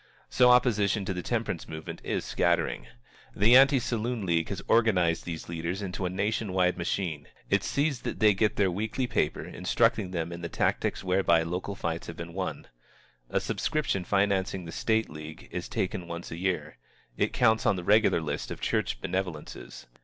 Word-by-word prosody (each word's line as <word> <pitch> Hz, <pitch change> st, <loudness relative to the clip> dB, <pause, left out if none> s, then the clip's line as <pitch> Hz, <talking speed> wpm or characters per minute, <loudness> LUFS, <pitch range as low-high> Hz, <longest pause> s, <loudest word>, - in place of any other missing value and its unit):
So 125 Hz, -1 st, +5 dB
opposition 105 Hz, -5 st, +3 dB
to 95 Hz, -, -2 dB
the 90 Hz, -, -4 dB
temperance 110 Hz, -4 st, -2 dB
movement 80 Hz, 0 st, -7 dB
is -, -, -2 dB
scattering. -, -, 0 dB, 0.5 s
The 110 Hz, +5 st, +6 dB
Anti 135 Hz, +1 st, +7 dB
Saloon 120 Hz, -2 st, -2 dB
League 85 Hz, -2 st, +1 dB
has -, -, -4 dB
organized 95 Hz, -8 st, +3 dB
these 85 Hz, -2 st, -6 dB
leaders 85 Hz, +4 st, -3 dB
into 95 Hz, -1 st, -3 dB
a -, -, -2 dB
nation 100 Hz, +2 st, -1 dB
wide 90 Hz, -1 st, +2 dB
machine. 85 Hz, -3 st, -3 dB, 0.2 s
It -, -, +3 dB
sees 140 Hz, -3 st, 0 dB
that -, -, -4 dB
they 110 Hz, -1 st, +6 dB
get 105 Hz, +2 st, +1 dB
their 95 Hz, -3 st, +2 dB
weekly 110 Hz, +7 st, -2 dB
paper, -, -, -1 dB
instructing 95 Hz, -, +1 dB
them 85 Hz, -2 st, -3 dB
in 85 Hz, 0 st, -7 dB
the 85 Hz, -, -4 dB
tactics -, -, 0 dB
whereby 90 Hz, -3 st, +3 dB
local 90 Hz, +4 st, -4 dB
fights 85 Hz, -3 st, -3 dB
have 85 Hz, -, -7 dB
been 85 Hz, 0 st, -7 dB
won. 95 Hz, 0 st, -4 dB, 0.6 s
A -, -, +1 dB
subscription 155 Hz, -, -1 dB
financing 95 Hz, -1 st, 0 dB
the 80 Hz, -, -7 dB
State 110 Hz, +5 st, +1 dB
League 75 Hz, 0 st, -9 dB
is -, -, -5 dB
taken 90 Hz, -2 st, -2 dB
once 85 Hz, +1 st, -6 dB
a 80 Hz, -, -5 dB
year. 85 Hz, -5 st, -2 dB, 0.4 s
It -, -, 0 dB
counts 110 Hz, -2 st, +3 dB
on -, -, +4 dB
the 90 Hz, -, -5 dB
regular 105 Hz, -2 st, +4 dB
list 75 Hz, -2 st, -3 dB
of -, -, -6 dB
church -, -, -1 dB
benevolences. 90 Hz, -5 st, -5 dB
95 Hz, 180 wpm, -28 LUFS, 85-110 Hz, 0.6 s, Anti